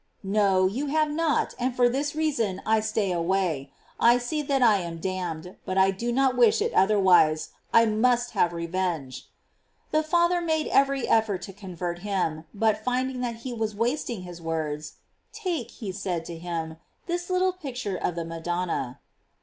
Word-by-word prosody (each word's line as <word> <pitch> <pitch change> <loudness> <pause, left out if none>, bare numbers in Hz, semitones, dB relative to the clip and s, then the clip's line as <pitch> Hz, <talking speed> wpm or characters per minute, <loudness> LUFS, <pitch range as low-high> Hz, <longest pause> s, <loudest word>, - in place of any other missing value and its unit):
No, 195 -1 +3
you 245 +10 -1
have 305 +1 +1
not, 320 0 +1
and 250 0 -1
for 245 -1 +4
this 285 +4 -1
reason 235 -12 0
I 220 0 +3
stay 215 -2 0
away: 170 -5 0 0.3
I 240 +1 +6
see 245 +5 -2
that 275 -3 +1
I 220 -4 +6
am 170 -3 -5
damned, 180 -1 -4
but 185 - -3
I 190 0 +5
do 235 +5 -3
not 265 +1 +3
»^ish 440 - +4
it 450 +2 0
otherwise, 185 -6 +4 0.2
I 230 - +6
must 240 +2 +2
have 185 -5 +2
revenge." 170 -5 -3 0.6
The 310 - +3
father 345 +2 +2
made 315 -2 0
every 275 -1 +2
effort 210 -5 +2
to 195 - -8
convert 180 -3 -5
him, 175 -5 -2
but 215 0 +1
rinding 255 +1 -1
that 240 -2 -2
he 255 - -3
was 220 -2 -2
wasting 235 -2 -1
his 175 -1 -9
words, 155 -2 -3 0.2
" - - -46
Take,'* 335 - -2
he 210 -6 -6
said 180 -4 -3
to 170 - -6
him, 165 -1 -4
(( - - -43
this 350 0 -3
little 370 0 +2
picture 260 - -5
of 175 - -2
the 170 -1 -3
Madonna." 165 -5 -3
210 Hz, 175 wpm, -26 LUFS, 175-260 Hz, 0.6 s, I